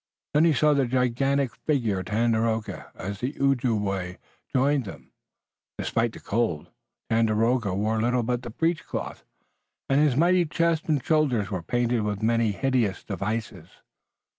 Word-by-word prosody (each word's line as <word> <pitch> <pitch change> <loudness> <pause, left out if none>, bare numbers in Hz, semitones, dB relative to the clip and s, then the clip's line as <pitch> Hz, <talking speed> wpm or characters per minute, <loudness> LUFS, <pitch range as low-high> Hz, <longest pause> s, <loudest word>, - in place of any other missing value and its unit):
Then 150 +3 +5
he 165 - +4
saw 150 +3 +3
the 140 -3 +2
gigantic 130 +1 +1
figure 120 -10 0
of 95 - -6
Tandakora, 110 +1 0
as 100 +2 -6
the 130 +5 -4
Ojibway 105 -9 0 0.3
joined 135 0 +2
them. 95 - -11 0.7
Despite 115 0 -1
the - - -10
cold, 105 -9 -2 0.4
Tandakora 115 -1 +2
wore 110 +2 0
little 120 +1 +1
but 120 +1 -1
the 120 - -7
breechcloth, 165 +8 -3 0.6
and 135 +2 +3
his 150 -4 +3
mighty 175 +2 +4
chest 165 0 0
and 145 -5 +1
shoulders 130 -11 +1
were 95 -3 -2
painted 120 +4 0
with 105 0 -3
many 115 -1 +2
hideous 120 -3 0
devices. 100 -3 -4
120 Hz, 140 wpm, -26 LUFS, 110-135 Hz, 0.7 s, Then